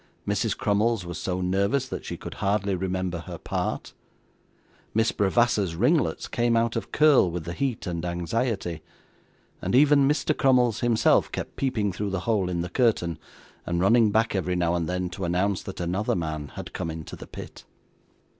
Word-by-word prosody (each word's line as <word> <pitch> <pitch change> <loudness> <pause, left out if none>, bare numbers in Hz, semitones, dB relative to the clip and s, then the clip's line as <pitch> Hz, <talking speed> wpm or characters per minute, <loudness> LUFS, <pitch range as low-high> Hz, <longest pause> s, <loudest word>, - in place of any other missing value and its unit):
Mrs. - - 0
Crummles 105 0 +1
was 85 -2 -6
so 90 0 -2
nervous 100 +9 +1
that - - -6
she - - -5
could - - -8
hardly 100 0 +1
remember 95 -1 -2
her 80 - -8
part. - - -3 1.0
Miss 110 +1 +3
Bravassa's 105 -3 +2
ringlets 130 - +1
came 120 -1 +1
out 115 0 +1
of 115 - -4
curl 150 -10 +5
with 85 -1 -4
the 85 - -4
heat 130 +1 -2
and 85 -2 -3
anxiety; 90 0 -2 0.8
even 140 +1 +5
Mr. 150 0 +1
Crummles 125 -4 +3
himself 115 -2 +3
kept - - -5
peeping 110 -7 0
through 100 +3 -3
the 95 -2 -2
hole 100 -4 0
in 85 -1 -1
the 90 - -4
curtain, 90 - +1 0.4
and 85 0 -1
running 110 +4 +5
back, 110 +2 +2
every 90 -1 0
now 85 -1 +1
and 85 -1 -1
then, 90 0 -1
to 95 +2 -6
announce 90 +3 0
that 95 - -8
another 90 +5 0
man 80 -4 -3
had - - -7
come 80 - -3
into 80 -1 -7
the - - -11
pit. - - -10
100 Hz, 175 wpm, -26 LUFS, 90-115 Hz, 1.0 s, curl